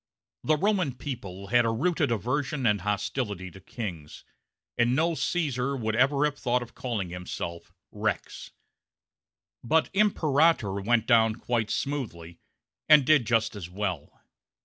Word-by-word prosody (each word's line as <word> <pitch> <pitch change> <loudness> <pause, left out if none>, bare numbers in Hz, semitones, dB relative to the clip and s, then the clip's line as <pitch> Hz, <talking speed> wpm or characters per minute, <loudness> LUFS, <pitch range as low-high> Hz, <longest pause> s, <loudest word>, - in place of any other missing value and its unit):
The 155 0 +2
Roman 185 - +1
people 100 -8 -7
had 120 0 +4
a 115 - +1
rooted 145 +3 0
aversion 130 +5 -1
and 105 -4 +2
hostility 100 -1 -3
to 95 - -13
kings; 90 - -7 0.5
and 120 +1 +2
no 165 +4 +2
Caesar 140 -6 -1
would 110 -2 -2
ever 140 +4 +3
have 150 -1 -2
thought 125 0 0
of 120 - -14
calling 110 -8 -3
himself 85 -1 -6 0.2
rex. - - -3 1.1
But 160 +7 +2
imperator 155 - +2
went 115 +2 +2
down 115 -2 +4
quite 115 -2 -2
smoothly, 95 - -4 0.5
and 150 -3 +8
did 145 -5 +4
just 110 -1 +1
as 90 -4 -7
well. 90 -5 -4
120 Hz, 135 wpm, -27 LUFS, 100-145 Hz, 1.1 s, and